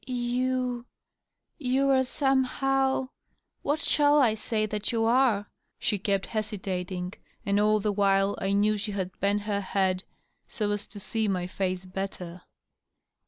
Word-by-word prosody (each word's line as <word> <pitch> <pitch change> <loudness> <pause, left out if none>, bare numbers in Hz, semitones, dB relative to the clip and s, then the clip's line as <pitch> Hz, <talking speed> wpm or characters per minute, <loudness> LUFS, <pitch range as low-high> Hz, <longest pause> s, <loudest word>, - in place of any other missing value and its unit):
"You.. 250 0 -1 0.7
you 270 0 +2
are 260 -1 +4
somehow.. 270 0 +1 0.5
what 295 +2 0
shall 295 0 +4
I 240 -6 +4
say 215 0 -1
that 210 +1 -3
you 225 -1 +1
are?" 230 -4 +3 0.3
she 205 - 0
kept 195 0 0
hesitating, 185 -4 -3 0.3
and 200 0 +2
all 215 +1 +4
the 210 0 0
while 195 0 +3
I 195 +1 0
knew 210 +1 +3
she 210 0 -4
had 190 -2 -3
bent 200 +1 +1
her 205 -1 -1
head 190 -1 0 0.4
so 210 -2 -2
as 205 0 -2
to 205 - -10
see 220 +2 -1
my 185 -3 0
face 185 0 -2
better. 185 -2 -6
210 Hz, 145 wpm, -28 LUFS, 195-250 Hz, 0.7 s, are